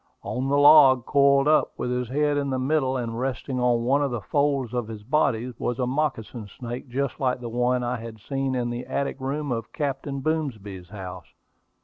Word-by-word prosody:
On 130 +2 -2
the 140 - +3
log, 145 -4 +7
coiled 140 0 +4
up, 155 0 +3
with 125 - -2
his 125 -1 -2
head 145 +2 +1
in 140 -1 -1
the 130 - -1
middle 130 0 +1
and 115 -2 -4
resting 130 0 -3
on 120 -1 +2
one 135 +4 +2
of 140 - +1
the 120 -2 -3
folds 140 0 0
of 120 -3 -2
his 110 -2 -8
body, 125 -2 0
was 120 - -2
a 125 - 0
moccasin 125 -5 -2
snake 120 +1 -6
just 135 +1 -2
like 130 -2 0
the 120 -1 -6
one 125 +1 +1
I 120 +1 -1
had 115 -1 -9
seen 135 +3 -2
in 120 -1 -1
the 120 +1 -5
attic 140 0 -2
room 140 +2 -3
of 115 -1 -3
Captain 140 -1 -3
Boomsby's 110 - -3
house. 95 -4 -8
130 Hz, 205 wpm, -25 LUFS, 120-140 Hz, -, log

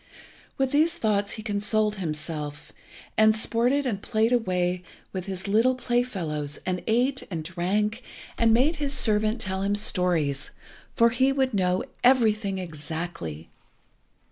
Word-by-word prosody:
With 270 -1 +1
these 315 +4 +2
thoughts 205 -2 0
he 215 - -7
consoled 210 0 0
himself, 150 -3 -4 0.5
and 215 0 +6
sported 245 +6 +1
and 210 -6 -2
played 220 +1 +1
away 180 -6 +1 0.3
with 185 0 -4
his 190 0 -4
little 225 +6 +3
play 245 -1 +1
fellows, 155 - -4
and 180 -1 -1
ate, 250 +4 +1
and 165 -4 -4
drank, 200 +7 -1 0.3
and 230 -1 +3
made 270 +8 +3
his 285 -2 -2
servant 215 0 +2
tell 190 0 -2
him 200 +1 +1
stories, 175 -9 +1 0.5
for 235 0 +5
he 260 +3 +3
would 265 -2 0
know 185 -2 +1 0.2
everything 220 -6 +3
exactly. 160 - -6
210 Hz, 140 wpm, -26 LUFS, 180-235 Hz, 0.5 s, and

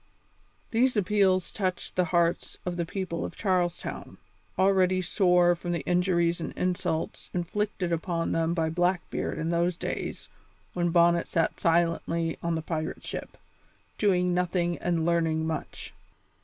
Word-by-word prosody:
These 250 +1 +2
appeals 190 -2 +2
touched 185 -3 -3
the 180 - +2
hearts 170 0 0
of 180 -1 -2
the 170 -1 -2
people 180 -2 -3
of - - -5
Charles 180 -4 +1
Town, - - -7 0.4
already 185 -1 +3
sore 180 -1 +3
from 175 0 -4
the 170 - -1
injuries 175 -1 +1
and - - -4
insults 180 -3 -2
inflicted 180 0 -2
upon 165 0 -1
them 165 +1 +1
by 160 -2 0
Blackbeard 175 +1 -1
in 160 - -2
those 170 +1 +1
days - - -4 0.5
when 175 -1 0
Bonnet 170 0 +4
sat 165 -1 0
silently 165 0 +1
on 170 -1 -1
the 160 - -3
pirate 160 -1 -4
ship, - - -6 0.6
doing 180 -3 +2
nothing 175 -1 0
and 170 -2 0
learning 165 -2 +1
much. 160 -2 -5
175 Hz, 140 wpm, -28 LUFS, 170-185 Hz, 0.6 s, Bonnet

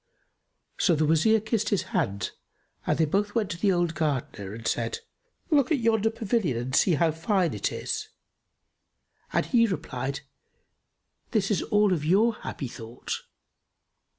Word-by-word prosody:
So 175 -4 +4
the 155 0 +2
Wazir 165 +9 +4
kissed 220 0 -1
his 200 - +1
hand 120 - 0 0.6
and - - +2
they 160 - +3
both 205 +7 0
went 215 -4 0
to 170 - -4
the 200 0 +3
old 175 -2 +1
Gardener 140 - -2
and 110 +1 -6
said, 115 -1 -1 0.5
"Look 285 -1 +3
at 310 - +4
yonder 225 -2 +2
pavilion 220 - 0
and 125 +3 -2
see 180 - +4
how 165 +2 +3
fine 170 +2 +1
it - - -1
is!" - - -3 1.2
And - - +1
he 230 -3 +4
replied, 140 - -3 1.1
"This 215 -3 +1
is 200 - +2
all 210 -2 +3
of 155 -4 -1
your 205 +9 +4
happy 140 -9 -6
thought." 115 0 -9
180 Hz, 150 wpm, -27 LUFS, 145-215 Hz, 1.2 s, So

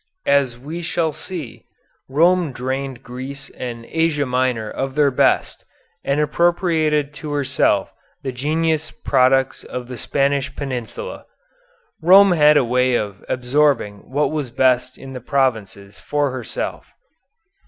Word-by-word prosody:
As 140 -4 +2
we 155 +7 -7
shall 165 -2 -1
see, 160 -10 -8 0.4
Rome 170 +1 +3
drained 130 +1 -4
Greece 130 +3 -8
and 120 -2 -7
Asia 160 0 0
Minor 125 -3 0
of 135 +4 -4
their 145 -2 +3
best, 125 - +1 0.4
and 140 +1 0
appropriated 155 -2 +1
to 150 0 -6
herself 140 -2 +1 0.3
the 135 - -2
genius 155 +4 -1
products 130 0 +1
of 125 -1 -6
the 125 - -7
Spanish 140 0 0
Peninsula. 135 - -6 0.7
Rome 190 +4 +7
had 150 -3 +5
a 135 - +3
way 125 +1 +2
of 100 -4 -3
absorbing 125 -5 0
what 145 +3 0
was 150 -5 -3
best 130 +1 +1
in 135 0 -10
the 125 - -7
provinces 110 -7 -1
for 145 -2 -1
herself. 130 -3 -5
135 Hz, 130 wpm, -20 LUFS, 125-150 Hz, 0.7 s, Rome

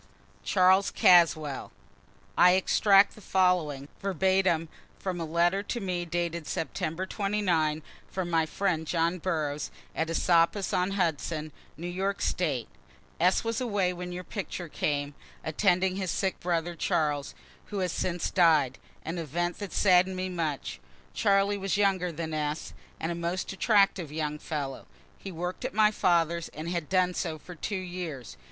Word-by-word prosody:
CHARLES 190 +1 +4
CASWELL. 155 -5 +4 0.6
[I 180 0 +7
extract 195 +1 +4
the 215 - -14
following, 180 -8 +1
verbatim, 190 -3 +2 0.3
from 180 -3 -4
a - - -2
letter 170 +4 +2
to 235 +4 -4
me 180 -3 -2
dated 170 -1 -2
September 165 +2 -3
29, 185 -7 0 0.3
from 185 -2 -3
my 165 -1 +2
friend 165 -2 -1
John 170 +2 0
Burroughs, 155 -4 -2 0.3
at 160 0 -1
Esopus 170 +3 +2
on 180 +2 +1
Hudson, 160 -3 -1 0.3
New 170 - -7
York 190 +3 -2
State.] 145 -9 -1 0.5
S. 180 +3 +3
was 230 +1 -2
away 205 -7 0
when 180 0 -6
your 180 +1 -5
picture 185 -2 -5
came, 145 -2 -2 0.3
attending 185 +3 +1
his 190 -2 -2
sick 190 +3 -1
brother, 175 -1 -1
Charles 155 -5 -1 0.3
who 205 - -6
has 185 -3 0
since 175 -1 -2
died 155 -8 +4 0.3
an 170 +2 -3
event 175 +3 -2
that 205 -2 -5
has - - -6
sadden'd 185 -1 +4
me 185 0 -2
much. 150 - -3 0.3
Charlie 200 0 +2
was 195 0 -1
younger 190 -3 +2
than 160 0 -5
S., 150 0 -3 0.3
and 160 - -2
a - - -1
most 170 +3 -3
attractive 195 - +2
young 150 -1 -3
fellow. 140 -4 -5 0.3
He 195 - -7
work'd 180 +6 -5
at 255 -2 -4
my 215 -1 +5
father's 170 -4 +1
and 155 +2 -6
had 170 -4 -3
done 185 -1 +2
so 165 -3 -3
for 180 +4 -11
two 190 +5 -4
years. 175 - -5
175 Hz, 155 wpm, -28 LUFS, 160-190 Hz, 0.6 s, I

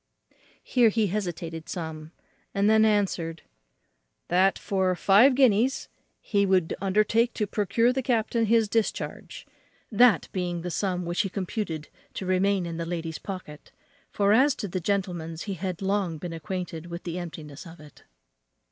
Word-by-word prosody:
Here 240 -3 +4
he 220 0 +1
hesitated 170 -5 -4
some 160 -3 -4
time, 155 - -16 0.4
and 200 +1 +2
then 220 0 +5
answered 185 -6 0 0.9
"That 185 +2 +3
for 190 -2 0
five 215 +9 +5
guineas 255 0 +3 0.3
he 200 -2 0
would 185 -4 +2
undertake 215 +4 +2
to 210 - 0
procure 230 +4 +1
the 265 - -1
captain 230 -2 0
his 225 0 +3
discharge. 225 +1 -3 0.5
"That 235 +1 +5
being 175 -2 -2
the 180 - -4
sum 180 -1 -1
which 175 +1 0
he 195 - -2
computed 185 -5 -4 0.3
to 190 - -4
remain 185 0 +1
in 165 -1 -5
the 170 - -3
lady's 165 -2 -4
pocket; 185 -6 -8 0.4
for, 200 0 +2
as 265 +4 +4
to 205 - -4
the 185 0 -3
gentleman's, 175 -4 -2
he 200 - -4
had 185 0 -4
long 195 -4 0
been 170 +2 -6
acquainted 165 0 -5
with 170 0 -7
the 175 0 -4
emptiness 155 -3 -8
of 165 +1 -12
it. 150 -2 -16
190 Hz, 155 wpm, -26 LUFS, 170-210 Hz, 0.9 s, then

